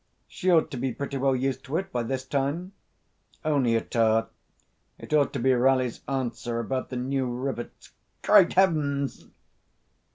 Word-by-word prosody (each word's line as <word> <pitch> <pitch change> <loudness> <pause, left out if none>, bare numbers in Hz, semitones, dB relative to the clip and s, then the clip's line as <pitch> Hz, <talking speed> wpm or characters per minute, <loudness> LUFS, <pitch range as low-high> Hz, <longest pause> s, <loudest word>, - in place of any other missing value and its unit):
"She 185 - -2
ought 160 -3 +4
to 135 - -5
be 130 0 -2
pretty 140 +2 -4
well 135 0 +2
used 130 +1 -2
to 145 +4 -2
it 190 +1 -4
by 120 - -1
this 130 +3 -3
time. 145 +7 -2 0.7
Only 135 -7 +2
a 115 - +2
tar. 115 -1 +1 0.7
It - - -8
ought 145 -3 +3
to - - -2
be 130 +2 +3
Ralli's 130 -1 +2
answer 120 -3 -2
about 130 +3 -3
the 130 - -5
new 130 +1 -1
rivets.... 125 -1 -5 0.3
Great 200 -4 +6
Heavens!" 145 -7 +1
135 Hz, 160 wpm, -26 LUFS, 125-145 Hz, 0.7 s, Great